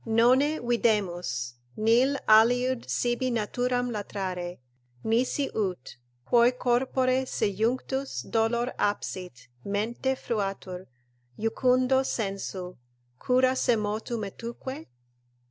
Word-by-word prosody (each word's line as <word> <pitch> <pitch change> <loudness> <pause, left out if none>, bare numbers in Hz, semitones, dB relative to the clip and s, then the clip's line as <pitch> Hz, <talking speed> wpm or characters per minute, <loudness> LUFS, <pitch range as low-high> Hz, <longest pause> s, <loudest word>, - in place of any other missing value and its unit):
"Nonne 255 +7 +3
videmus, 180 - 0 0.2
Nil 240 +6 +3
aliud 245 +3 +4
sibi 240 +1 0
naturam 245 +2 -1
latrare, 185 -4 -4 0.5
nisi 250 +5 +1
ut, 185 - -3 0.3
quoi 240 - +5
Corpore 255 +1 +1
sejunctus 240 +7 -1
dolor 235 +2 +1
absit, 180 -10 -3 0.2
mente 230 +6 -1
fruatur, 195 -6 -4 0.5
Jucundo 255 +4 +2
sensu, 195 - -4 0.4
cura 255 +1 +3
semotu' 225 -2 0
metuque?" 230 0 -6
230 Hz, 80 wpm, -27 LUFS, 200-250 Hz, 0.5 s, quoi